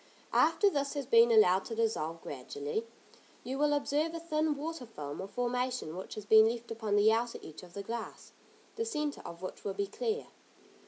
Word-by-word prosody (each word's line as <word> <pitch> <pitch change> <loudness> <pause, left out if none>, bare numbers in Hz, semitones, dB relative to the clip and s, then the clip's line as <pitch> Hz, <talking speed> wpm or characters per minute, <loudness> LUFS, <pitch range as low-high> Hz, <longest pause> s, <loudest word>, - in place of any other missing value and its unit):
After 410 - +4
this 285 -6 0
has 285 -2 -2
been 235 -1 +6
allowed 195 -4 +6
to 225 - -5
dissolve 170 -8 -1
gradually, 145 - -4 0.6
you 265 +2 -4
will 295 0 +3
observe 295 +3 0
a - - -3
thin 310 -2 0
water 305 -3 -5
film 145 -9 -6
or 190 - -5
formation 245 -5 -2
which 185 - -7
has 215 - -7
been 220 +1 +7
left 235 0 -5
upon 220 -2 -1
the 205 +1 +6
outer 235 +1 -1
edge 155 - -10
of 180 -2 -14
the 200 - -5
glass, 230 +2 -6 0.5
the 455 - 0
centre 300 -10 -2
of 170 +2 -9
which 185 - -6
will 195 -1 -3
be 200 - 0
clear. 445 - -2
230 Hz, 195 wpm, -32 LUFS, 200-290 Hz, 0.6 s, been